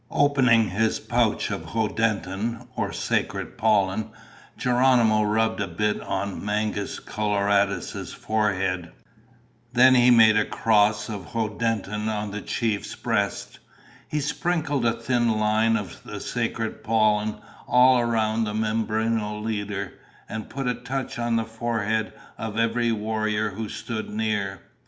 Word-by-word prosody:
Opening 125 -6 +3
his 110 +3 +1
pouch - - 0
of - - -3
hoddentin, 110 +1 -1
or - - -2
sacred - - -2
pollen, 110 -1 +1 0.5
Geronimo 125 -3 +3
rubbed 110 +1 +1
a 100 - -1
bit 105 +5 -1
on 100 -1 -3
Mangus 105 -1 -2
Coloradus' 100 -2 0
forehead. 95 -5 -1 0.8
Then 130 +1 +7
he 125 -1 +6
made 110 -3 +7
a 105 - +4
cross 105 -1 +2
of 105 -1 -7
hoddentin 110 -1 -1
on 105 -1 -3
the 105 0 -5
chief's 110 -3 -2
breast. 105 -4 -2 0.5
He 150 - -1
sprinkled 150 -3 0
a 115 - +2
thin 115 -1 0
line 110 +1 +2
of 100 -6 -7
the - - -7
sacred 110 -1 -3
pollen 110 -1 +2 0.3
all 125 0 +6
around 115 -1 +1
the 105 0 -3
Mimbreno 110 0 -1
leader 105 -3 -3 0.3
and 110 -1 -6
put 135 0 -4
a 125 - +2
touch 125 +1 -5
on 120 -1 0
the 115 0 0
forehead 110 -1 -2 0.3
of 110 -1 -4
every 115 +1 +1
warrior 110 -1 -1
who 105 +2 -5
stood 110 -2 -5
near. 105 -3 -2
110 Hz, 130 wpm, -25 LUFS, 105-115 Hz, 0.8 s, Then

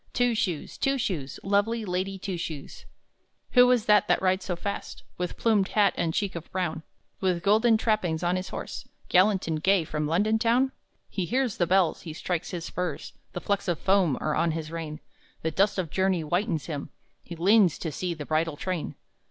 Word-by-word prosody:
Two 245 -1 +2
Shoes, 195 -9 -2
Two 275 0 +1
Shoes, 175 - -3
Lovely 205 +3 +1
Lady 190 +1 -2
Two 190 0 -4
Shoes!"_ 160 -4 -6 0.7
Who 250 0 +7
is 245 -3 +3
this 210 -2 +5
that - - +3
rides 185 0 +1
so 180 - -2
fast, 200 +4 -5 0.2
With 180 -1 -3
plumed 215 -4 +2
hat 205 -1 +3
and 170 -2 0
cheek 195 +3 -1
of 170 -1 -7
brown, 170 -4 -2 0.4
With 180 -2 0
golden 220 +3 +4
trappings 185 -7 0
on 175 +1 +2
his 185 0 -3
horse, - - -6 0.2
Gallant 190 +1 +4
and 160 -2 -1
gay 190 0 +4
from 150 -1 -2
London 210 +7 +2
town? 245 +3 +3 0.4
He 185 - -3
hears 250 +2 0
the 175 - +2
bells, 185 -2 +2
he 160 - -7
strikes 175 +1 -3
his 170 -2 -5
spurs, 180 0 -4 0.2
The 175 - -4
flecks 200 0 -1
of 175 -3 +1
foam 190 -8 +2
are 155 - -1
on 170 -1 +1
his 160 -1 -5
rein, 160 -2 -5 0.4
The 160 - 0
dust 200 +5 +2
of 180 -5 -2
journey 190 -2 +1
whitens 170 +1 -1
him, 145 -4 -5 0.3
He 170 - -9
leans 190 0 +4
to 160 - -4
see 175 +3 -3
the 150 -2 -7
bridal 155 0 0
train! 180 -2 -3
185 Hz, 195 wpm, -27 LUFS, 165-205 Hz, 0.7 s, Who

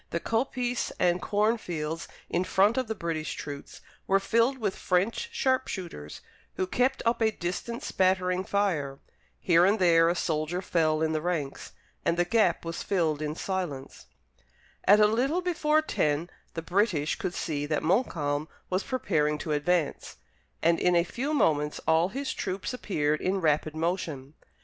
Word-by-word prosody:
The 170 - -2
coppice 245 +3 -1
and 175 0 +2
corn 215 +3 +1
fields 160 -3 -4 0.2
in 175 - 0
front 200 +4 +3
of 260 -2 -1
the 220 - -3
British 165 -4 -3
troops 145 -1 -8 0.3
were 195 0 +4
filled 230 +6 +2
with 210 -6 -2
French 195 - 0
sharp 260 - +1
shooters, 165 - -7 0.3
who 185 - 0
kept 250 +7 0
up 230 +1 +1
a 220 - +4
distant 215 +5 -4
spattering 185 -1 +1
fire. 170 -10 0 0.4
Here 170 -1 +4
and 200 +4 +4
there 165 -3 +5
a 175 - +1
soldier 160 +1 -1
fell 160 -4 +1
in 160 - +1
the 155 -1 -1
ranks, 155 -5 -3 0.3
and 170 - +1
the 175 - +3
gap 185 -4 +2
was 165 0 -4
filled 160 -6 0
in 150 0 -2
silence. 170 -9 -4 0.8
At 205 +2 +7
a 210 - +7
little 265 +11 +1
before 310 -3 +2
ten 155 - 0 0.2
the 165 - -4
British 175 -5 +1
could 180 - -3
see 145 -2 -2
that 150 -1 -1
Montcalm 155 - 0 0.2
was 185 +1 +1
preparing 155 - 0
to 155 - -5
advance, 150 +1 0 0.5
and 170 0 +4
in 180 0 +3
a 170 - +4
few 255 - -3
moments 150 - +1
all 165 +3 +4
his 270 +5 -3
troops 190 +6 -3
appeared 155 -11 -1
in 190 +1 0
rapid 155 -2 +1
motion. 160 -5 -3
180 Hz, 165 wpm, -28 LUFS, 155-215 Hz, 0.8 s, At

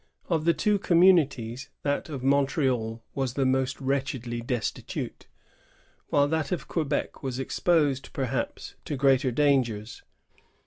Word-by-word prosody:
Of 160 -3 0
the 170 - +5
two 210 +2 +2
communities, 145 -9 +3
that 145 +1 -1
of 135 -4 -5
Montreal 130 -5 +1
was 135 -2 -2
the 135 - +1
more 130 0 +2
wretch 135 0 0
edly 120 -2 -5
destitute, 120 -2 -4 0.8
whilei 145 0 +4
that 160 -3 -1
of 170 -5 -2
Quebec 150 -4 -2
was 130 -2 -3
exposed, 140 0 +1
perhaps, 130 -2 -3
to 145 - -3
greater 135 -1 +3
dangers. 120 -5 +1
135 Hz, 130 wpm, -27 LUFS, 125-150 Hz, 0.8 s, the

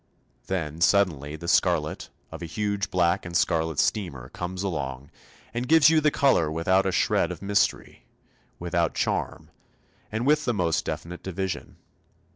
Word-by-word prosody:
Then 85 -4 -3
suddenly 80 -7 +2
the 85 +2 -8
scarlet - - +1 0.2
of - - -8
a 85 - -5
huge 100 +2 -2
black 90 +1 +1
and 85 0 -1
scarlet 80 -4 0
steamer 70 - -1
comes 90 +4 -5
along 70 -7 -4 0.4
and 120 +2 -3
gives 160 0 +6
you 160 -1 +4
the 150 - +4
colour 135 - +2
without 95 +4 +2
a - - +1
shred - - +1
of - - -8
mystery, 100 0 -1 0.5
without 85 -1 -1
charm, - - -2 0.6
and 110 +3 -2
with 150 +1 +3
the 120 - 0
most 85 -5 0
definite 85 +1 -5
division. 95 0 -4
90 Hz, 150 wpm, -26 LUFS, 80-100 Hz, 0.6 s, gives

